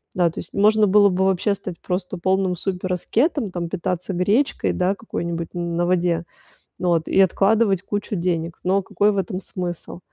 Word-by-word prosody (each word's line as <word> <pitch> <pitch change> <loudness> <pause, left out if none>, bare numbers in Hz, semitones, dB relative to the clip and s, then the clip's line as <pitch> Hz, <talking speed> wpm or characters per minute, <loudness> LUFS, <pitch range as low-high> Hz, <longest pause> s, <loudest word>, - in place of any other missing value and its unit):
Да, 175 -2 +3
то 160 - -8
есть - - -9
можно 215 +1 +4
было 205 +1 +6
бы 190 0 +1
вообще 190 +2 +2
стать 185 -3 -8
просто 180 +1 -3
полным 190 +1 +1
супераскетом, 195 - -1
там 175 -1 -4
питаться 180 +1 -3
гречкой, 205 +10 +1
да, 185 +2 +1
какой-нибудь 170 -6 -5
на 175 0 -1
воде 175 -2 +1 0.6
вот 170 -3 +1
и 195 - +4
откладывать 195 +1 +3
кучу 205 +1 -3
денег. 170 -2 -2
Но 190 +2 +2
какой 205 +2 +1
в 200 - -3
этом 185 -1 -2
смысл? 175 -2 -6
185 Hz, 165 wpm, -22 LUFS, 175-200 Hz, 0.6 s, было